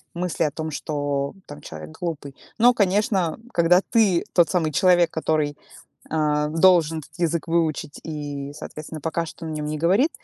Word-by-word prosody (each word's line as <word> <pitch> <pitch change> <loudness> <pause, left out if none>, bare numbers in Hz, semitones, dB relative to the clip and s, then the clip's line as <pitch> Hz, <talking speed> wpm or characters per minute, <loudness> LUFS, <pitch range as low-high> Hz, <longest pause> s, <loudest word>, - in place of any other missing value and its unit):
мысли 175 -1 -1
о 150 - 0
том, 160 +1 -5
что 145 -1 -2
там 145 - -10
человек 80 -1 -9
глупый. 145 -5 -4 0.2
Но, 245 +2 +6
конечно, 195 -4 +1 0.2
когда 175 +2 +4
ты 210 -7 +3
тот 175 -2 +4
самый 165 -4 +1
человек, 175 +1 +4
который, 155 -2 -1 0.5
а, 150 -1 +1
должен 165 -1 +4
этот 155 - -17
язык 170 -1 -1
выучить 155 -3 -1
и, 145 -2 -5
соответственно, 155 +1 -8
пока 165 +1 -1
что 165 - -10
на 160 - -4
нём 150 -1 -3
не 155 0 -3
говорит, 195 - +3
160 Hz, 165 wpm, -23 LUFS, 150-175 Hz, 0.5 s, Но